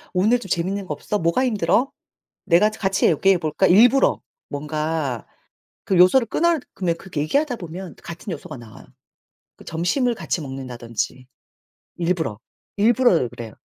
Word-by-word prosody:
"늘 215 +7 +3
좀 200 - -9
재밌는 190 +4 -1
거 155 - -3
없어? 205 +8 -3
뭐가 170 +10 +1
힘들어? 245 +2 +1 0.5
내가 195 +2 +4
저 215 - -11
같이 190 -1 +2
얘기해 185 +3 +3
볼까?" 160 +3 +1
일부러 240 +9 +5 0.3
뭔가 150 -3 -3 0.6
그 190 - 0
요소를 185 +8 +6
끊어 340 +7 +2 0.2
그럼 170 -3 -1
그렇게 170 -5 -5
얘기하다 280 - 0
보면 175 0 -8
같은 170 +4 -7
요소가 145 - -8
나와요. 115 -2 -14 0.7
그 - - -16
점심을 180 - 0
같이 175 - -3
먹는다든지 130 -2 -5 0.7
일부러. 170 - -2 0.4
일부러 215 - +3
그래요. 115 -2 -9
175 Hz, 320 characters per minute, -22 LUFS, 150-210 Hz, 0.7 s, 요소를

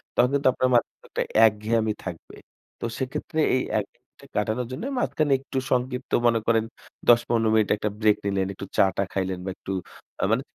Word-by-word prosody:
তখন 125 - +4
কিন্তু 140 -1 +2
আপনার 130 0 +1
মাঝে 120 - +4
অনেকটা - - -4 0.3
একঘেয়েমি 110 +1 0
থাকবে। 90 -3 -7 0.4
তো - - -4
সেক্ষেত্রে 130 +4 -3 0.2
এই 130 - +2 0.2
একঘেয়েমিটা - - -11
কাটানোর 110 +4 0
জন্য 130 - -5 0.2
মাঝখানে 155 - 0
একটু 135 0 -6
সংক্ষিপ্ত 125 +1 -1 0.2
মনে 115 -1 +3
করেন 115 -1 +3 0.5
১০-১৫ 120 -1 +4
মিনিটে 110 -2 +3
একটা 105 - -1
ব্রেক 105 -1 +4
নিলেন, 95 -1 0
একটু 100 - -7
চা-টা 95 0 +3
খাইলেন 95 -1 -1
বা - - -2
একটু 95 - -7 0.5
আ - - +4
মানে 115 - +2
115 Hz, 170 wpm, -25 LUFS, 105-125 Hz, 0.5 s, তখন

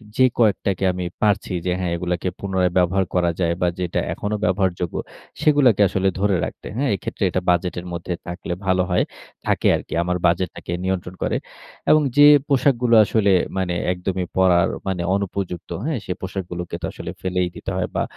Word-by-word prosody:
যে 130 - +5
কয়েকটাকে 100 -4 +1
আমি 90 0 -4 0.2
পারছি 105 -3 +1
যে, 90 - +1
হ্যাঁ, 90 -2 -1
এগুলাকে 90 +1 -2
পুনরায় 95 -2 0
ব্যবহার 95 +2 +2
করা 85 -1 +3
যায় 85 -2 +2
বা, 90 - +3
যেটা 90 -2 -1
এখনো 105 +1 -3
ব্যবহারযোগ্য, 90 -4 0 0.5
সেগুলাকে 135 -9 +4
আসলে 95 +1 0
ধরে 100 -1 +2
রাখতে। - - -8
হ্যাঁ? 140 +1 +1
এক্ষেত্রে 95 - -5
এটা 95 - -1
বাজেটের 90 0 0
মধ্যে 85 +1 -4
থাকলে 85 0 -4
ভালো 95 -1 +3
হয়, 90 - +3 0.4
থাকে - - +2
আরকি। - - -6
আমার 90 +1 -1
বাজেটটাকে 85 0 -2
নিয়ন্ত্রণ 95 -1 -2
করে। - - 0 0.5
এবং 155 - +6 0.2
যে 145 - +9 0.2
পোশাকগুলো 125 -4 +3
আসলে 100 -1 +2 0.3
মানে 95 -2 0 0.2
একদমই 90 0 -2
পরার, 90 -2 +4 0.2
মানে 90 -2 -1
অনুপযুক্ত, 95 -3 -3 0.2
হ্যাঁ? 150 -6 -1
সে - - -4
পোশাকগুলোকে 90 -2 -5
তো - - -2
আসলে - - -7
ফেলেই 90 -1 0
দিতে - - -5
হয় 90 - 0
বা, - - +1
95 Hz, 170 wpm, -22 LUFS, 90-100 Hz, 0.5 s, যে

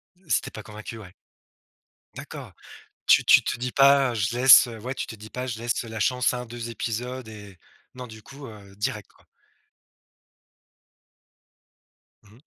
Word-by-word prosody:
Heu, 180 -3 -27
si - - +2
tu - - -9
es - - -25
pas 110 - -9
convaincu, 110 +2 -9
ouais. 100 -5 -12 1.0
D'accord. - - -10 0.5
Tu - - +5
tu - - +6
te - - -3
dis 125 0 -4
pas: 135 -2 +4
«Je 110 +2 -1
laisse». 130 0 +8
Heu, 115 -2 -9
Ouais, 130 +4 -5
tu - - -4
te 110 - -8
dis 110 +1 -12
pas: 125 0 -5
«Je 115 -3 -5
laisse 120 0 -2
la 115 -1 -7
chance 125 +1 +1
à 125 - -3
1-2 120 -1 -7
épisodes» 120 +2 -5
et 100 -3 -12 0.4
non, 125 - -7
du 110 -1 -12
coup, 140 +5 -12
heu, 100 -3 -14
direct 105 -1 -4
quoi. - - -27 3.0
Mmh 105 - -21
mh. 125 - -22
115 Hz, 175 wpm, -25 LUFS, 110-125 Hz, 3.0 s, laisse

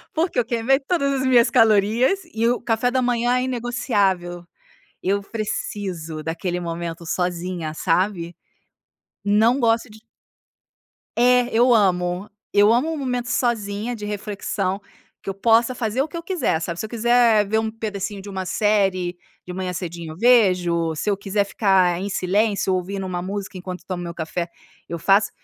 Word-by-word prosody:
Porque 325 -4 +1
eu - - +3
queimei 240 +4 +2
todas 280 -1 0
as 260 - 0
minhas 245 -1 +5
calorias. 225 - +3
E 225 +1 +1
o 245 - +1
café 235 +1 0
da 255 0 +1
manhã 245 0 +1
é 250 - 0
inegociável. 205 -8 -1 0.6
Eu 200 +2 +1
preciso 190 -7 -4
daquele 175 +2 -3
momento 170 0 -5
sozinha, 175 -2 -2
sabe? 175 0 0 0.9
Não 220 +6 +3
gosto 230 -1 +1
de 220 - -14 1.2
É, 250 0 +4
eu 240 +2 +5
amo, 180 -2 +1 0.2
eu 205 +2 +6
amo 305 +7 +1
momento 250 -3 -2
sozinha 230 -1 -1
de 210 - -7
reflexão, 205 -2 -3 0.4
que - - -6
eu - - -2
possa 230 +5 +3
fazer 235 +2 -1
o 300 - -1
que 325 - -11
eu 335 - -6
quiser, 335 - 0
sabe? 170 +1 -4
Se - - -2
eu - - -8
quiser 235 -2 +3
ver 220 +2 +1
um 220 0 -1
pedacinho 205 -2 -5
de 200 - -9
uma 190 -1 -4
série 190 -2 +1 0.3
de 180 - -7
manhã 185 -1 -3
cedinho, 170 -2 -6
eu - - -14
vejo. 180 -8 +3
Se 210 - -2
eu 200 - 0
quiser 200 +1 0
ficar 190 -4 +2
em 200 - -3
silêncio 195 +1 +1
ouvindo 190 +1 -3
uma 180 -1 -3
música 195 +1 -5
enquanto 180 0 -7
tomo 180 -2 -4
meu 170 -1 -6
café, 170 +1 -3 0.4
eu 170 - -3
faço. 195 +5 +3
205 Hz, 165 wpm, -22 LUFS, 180-235 Hz, 1.2 s, eu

